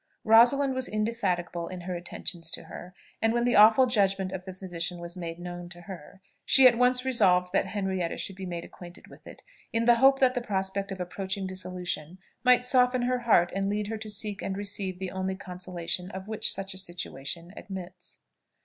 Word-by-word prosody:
Rosalind 245 +5 +5
was 260 0 -1
indefatigable 190 -6 -2
in 185 -1 -7
her 180 +1 -5
attentions 175 -1 -5
to - - -2
her; 180 +1 -11 0.3
and 225 0 +2
when 240 0 +1
the 245 0 +2
awful 220 +5 +7
judgment 195 -5 +1
of 185 -1 -6
the 190 - -6
physician 180 -2 -5
was 170 +1 -6
made 170 -2 -6
known 175 0 -7
to 175 0 -9
her, 185 0 -11 0.2
she 265 -1 +7
at 240 - +4
once 250 +1 +2
resolved 185 -8 +3
that - - +2
Henrietta 190 -4 -2
should 195 - -2
be 190 -1 -7
made 170 -1 -5
acquainted 175 -1 -13
with - - -16
it, - - -13 0.3
in 230 -1 0
the 240 0 +6
hope 270 +2 +5
that 260 -2 +3
the 245 - -2
prospect 195 -2 -2
of 190 - -6
approaching 190 +2 -4
dissolution 180 -3 -4 0.3
might 250 0 +5
soften 250 -1 +3
her 250 0 0
heart 215 -8 +3
and 195 0 -1
lead 205 0 -2
her 225 - -3
to 215 0 -7
seek 205 -1 -1
and 195 0 -3
receive 200 -2 -2
the 190 -1 -5
only 190 0 -3
consolation 180 -1 -5
of 190 0 -8
which 220 -1 +2
such 195 0 -2
a 190 - 0
situation 170 -1 -4
admits. 185 -2 -9
190 Hz, 200 wpm, -27 LUFS, 180-225 Hz, 0.3 s, awful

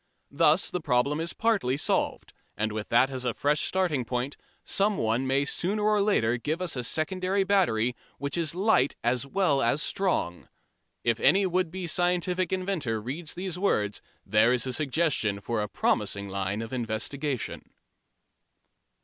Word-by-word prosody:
Thus 160 +4 +3
the 180 - -2
problem 140 +2 +1
is 165 +1 -2
partly 200 - +1
solved, - - -1 0.2
and 110 +1 -1
with 110 0 -5
that 130 +3 +4
as 130 -1 -4
a 120 -2 -1
fresh 145 +1 +1
starting 175 -9 +1
point 125 +3 -3 0.3
someone 135 - +1
may 135 +2 +2
sooner 200 +8 -1
or 210 -1 +3
later 125 - +2
give 155 +7 -2
us 180 -5 -1
a 125 - -3
secondary 185 +8 0
battery 125 - +2 0.2
which 140 -1 -3
is 165 -2 -1
light 185 - +2
as 120 +3 0
well 145 -4 +1
as 120 +4 +2
strong. 165 - -1 0.5
If 115 -1 +1
any 195 +1 +4
would 185 -1 0
be 185 +1 -5
scientific 180 +1 0
inventor 180 - -1
reads 145 +9 -5
these 180 -1 -4
words 105 - 0 0.2
there 110 +4 +4
is 125 -1 +1
a 130 - -2
suggestion 140 -7 0
for 110 +2 -2
a 105 - -2
promising 100 0 0
line 100 +2 -2
of 115 - -8
investigation. 130 +3 -3
145 Hz, 160 wpm, -27 LUFS, 120-180 Hz, 0.5 s, that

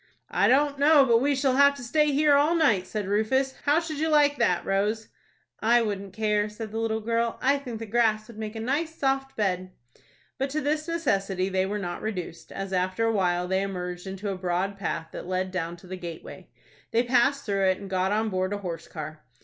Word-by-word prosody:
"I - - +3
don't 280 +1 +3
know 290 -1 +6
but 230 -2 +4
we 285 +1 +2
shall 265 -1 +1
have 280 0 +6
to 275 - -9
stay 300 +5 +2
here 295 +1 +4
all 295 +4 +4
night," 225 - +3
said 210 -3 -3
Rufus. 260 +7 +1
"How 295 +2 +4
should 320 -3 -5
you 320 +1 +1
like 290 -1 +4
that, 180 - +2
Rose?" 210 +3 0 0.5
"I 235 +2 +4
wouldn't 200 -2 -4
care," 210 -1 +1
said 215 0 -7
the 225 - -3
little 220 -1 -1
girl. 230 +1 0
"I 275 +2 +2
think 245 -5 -6
the 225 - -6
grass 215 -1 +1
would 225 -2 -12
make 215 0 -5
a - - -4
nice 295 +8 -1
soft 270 -2 -1
bed." 185 -3 -1 0.7
But 270 +1 0
to 300 +2 -2
this 305 +3 -1
necessity 195 - 0
they 190 0 0
were 205 +2 -2
not 175 -3 -4
reduced, 180 -6 -5
as 195 0 -5
after 185 +4 0
a 225 - +2
while 180 -3 +1
they 190 +1 +1
emerged 180 -2 -4
into 195 +2 -4
a - - -3
broad 185 +2 -1
path 165 -4 -4
that - - -7
led 185 0 -1
down 175 -2 -3
to 175 - -16
the 185 +1 -6
gateway. 170 -3 -9 0.4
They 230 +1 +2
passed 265 +3 +2
through 200 -2 +1
it, 185 0 +2
and 200 - -9
got 190 0 0
on 220 +1 +1
board 185 0 -1
a - - -1
horse 170 -4 -6
car. 155 -1 -8
215 Hz, 220 wpm, -26 LUFS, 190-270 Hz, 0.7 s, know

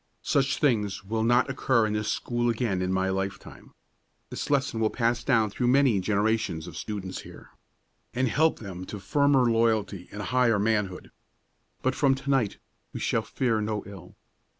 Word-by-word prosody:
Such 140 0 +1
things 105 -9 0
will 110 +2 -1
not 120 +2 +3
occur 130 -3 +1
in 105 - -1
this 105 0 -1
school 120 0 -1
again 110 -5 -1
in 90 0 -1
my 95 0 +1
lifetime. 95 +1 -5 0.6
This - - -5
lesson 140 -5 +1
will 110 -1 +2
pass 120 0 0
down 115 -6 +2
through 120 +4 -1
many 130 -5 +4
generations 100 -4 0
of - - -9
students 95 -3 -5
here, - - -13 0.6
and 130 +1 +1
help 155 +7 +2
them 95 -4 -8
to 105 - -6
firmer 140 +3 +3
loyalty 110 -5 0
and 105 0 -6
higher 125 0 +2
manhood. 105 -3 -1 0.7
But 130 - +2
from 135 -1 +3
to 140 +1 -3
night 130 -7 +1 0.4
we - - -5
shall - - 0
fear 115 -4 -1
no 105 -1 -2
ill. 95 -3 -12
110 Hz, 170 wpm, -27 LUFS, 100-130 Hz, 0.7 s, many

